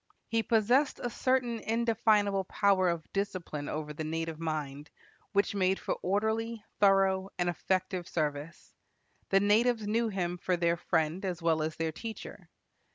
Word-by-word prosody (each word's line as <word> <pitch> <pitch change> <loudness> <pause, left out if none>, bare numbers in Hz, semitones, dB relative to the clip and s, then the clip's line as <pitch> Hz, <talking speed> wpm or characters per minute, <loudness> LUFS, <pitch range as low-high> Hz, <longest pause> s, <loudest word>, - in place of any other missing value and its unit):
He 225 0 +1
possessed 240 +6 +2
a 245 - -3
certain 250 -3 0
indefinable 220 -4 +2
power 190 -1 +2
of 170 -2 -4
discipline 180 -7 -3
over 150 -1 -4
the 155 - -5
native 165 0 -3
mind, 150 -2 -4 0.4
which 200 0 +1
made 190 -1 +2
for - - -2
orderly, 220 +3 -1
thorough, 195 -1 +3
and 175 - 0
effective 185 0 -1
service. 150 0 -4 0.6
The 195 - +5
natives 220 +3 +3
knew 225 +3 +1
him 180 -3 -2
for 180 0 0
their 170 0 +2
friend 165 +1 0
as 180 -4 -2
well 160 -1 +2
as 155 0 -2
their 165 -1 -1
teacher. 220 +7 -8
190 Hz, 150 wpm, -30 LUFS, 165-220 Hz, 0.6 s, The